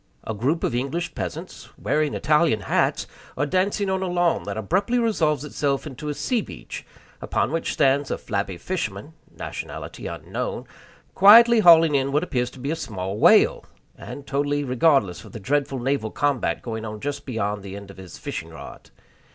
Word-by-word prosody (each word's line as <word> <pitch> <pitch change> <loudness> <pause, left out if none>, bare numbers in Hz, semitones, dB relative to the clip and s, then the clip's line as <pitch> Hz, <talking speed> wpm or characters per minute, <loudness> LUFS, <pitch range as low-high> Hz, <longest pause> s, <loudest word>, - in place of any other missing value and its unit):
A 110 - -4
group 135 +10 -1
of - - 0
English 140 +8 -2
peasants, 90 -4 -6
wearing 150 -1 0
Italian 150 -7 +2
hats, - - +1 0.3
are 145 - +1
dancing 195 +5 0
on 190 0 0
a 190 - -1
lawn 175 -1 +1
that 100 +1 -4
abruptly 195 - 0
resolves 160 - +1
itself 140 -1 -1
into 150 +1 -6
a 145 - -3
sea 245 - 0
beach, - - -9 0.4
upon - - -1
which 165 0 -1
stands 140 0 +2
a - - -1
flabby 100 -3 -3
fisherman 145 - -4 0.2
(nationality - - -7
unknown), - - -5 0.5
quietly 230 +4 +8
hauling 165 -5 +7
in 135 -1 +1
what 150 +4 +1
appears 125 -8 -1
to 130 - -14
be 140 +4 -3
a - - 0
small 100 - -5
whale, - - +5 0.3
and 140 - -9
totally 145 +1 0
regardless 125 - +2
of 110 - -14
the - - -6
dreadful 140 +4 -1
naval 130 -2 -1
combat 145 +1 -1
going 110 -2 -5
on 110 -1 -6
just 145 +4 -4
beyond 105 -4 -2
the 95 0 -8
end 100 -1 -9
of 95 - -16
his 95 -2 -10
fishing - - -6
rod. - - -11
140 Hz, 175 wpm, -23 LUFS, 110-165 Hz, 0.5 s, quietly